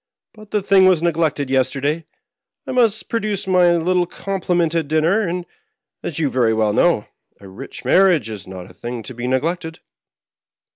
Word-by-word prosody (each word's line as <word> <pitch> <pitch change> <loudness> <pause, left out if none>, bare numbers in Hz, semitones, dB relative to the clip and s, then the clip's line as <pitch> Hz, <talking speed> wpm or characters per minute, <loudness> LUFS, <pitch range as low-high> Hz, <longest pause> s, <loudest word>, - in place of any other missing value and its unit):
But 215 -1 -15
the 210 -2 -1
thing 190 -1 +5
was 180 -3 +3
neglected 160 -5 0
yesterday; 135 +4 0 0.6
I - - -5
must 230 -4 +2
produce 210 -3 -2
my 180 -2 +4
little 175 +1 +1
com 195 +1 -5
pliment 175 -2 +1
at 165 -3 -1
dinner; 160 +7 +2
and, 180 -4 -2 0.6
as 155 - -5
you 160 -3 +1
very 120 -3 +2
well 110 -1 +1
know, 165 -3 +2 0.3
a 100 - -13
rich 100 +9 -10
marriage 180 - +4
is 105 -3 -8
not 95 -1 -9
a - - -18
thing 120 -1 -6
to 130 - -8
be 120 +1 -5
neglected." 160 +5 -2
165 Hz, 175 wpm, -20 LUFS, 130-185 Hz, 0.6 s, thing